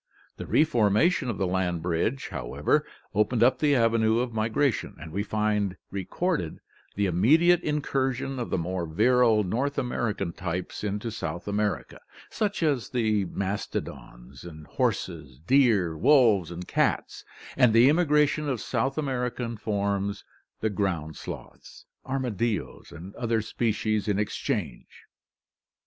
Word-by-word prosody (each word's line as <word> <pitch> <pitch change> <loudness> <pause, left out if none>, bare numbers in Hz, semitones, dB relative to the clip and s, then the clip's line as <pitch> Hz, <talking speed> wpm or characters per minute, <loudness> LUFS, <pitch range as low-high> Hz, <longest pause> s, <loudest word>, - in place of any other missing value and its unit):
The - - -7
re - - +4
formation 125 - +2
of 115 - -3
the 95 - 0
land 90 -2 -1
bridge, 90 +10 -1
however, 65 -5 -1 0.3
opened 110 +3 +2
up 130 +1 +4
the 145 -2 +3
avenues 115 -1 +3
of 125 -2 -6
migration, 115 +4 0
and 80 +1 -9
we 100 +5 -2
find 105 -2 -1
re 95 -2 -4
corded 165 - -2 0.4
the 100 - +1
immediate 155 - +4
incursion 135 -3 -1
of 120 - -3
the - - 0
more 90 0 -3
virile 115 +5 +3
North 125 +9 -1
American 120 -8 -2
types 90 +2 -4
into 105 +3 -3
South 85 -6 -5
America, 105 0 -2 0.3
such 205 -4 -1
as 140 -7 0
the 110 -5 +1
mastodons, 85 -9 -5 0.3
horses, 85 - -2
deer, 110 - +3
wolves, 110 - +4
and 85 +1 -7
cats, - - 0 0.3
and 125 -4 +5
the 115 +3 +6
immigration 150 -1 +3
of 130 -4 -1
South 135 +6 -1
American 125 -4 -2
forms, 100 -2 -2 0.4
the 110 - 0
ground 85 -6 -2
sloths, - - -10 0.2
armadillos, 120 -6 -2
and 90 +4 -10
other 115 -2 0
species 110 -2 -1
in 105 -2 +1
exchange. 105 -11 -3
110 Hz, 130 wpm, -27 LUFS, 95-130 Hz, 0.4 s, the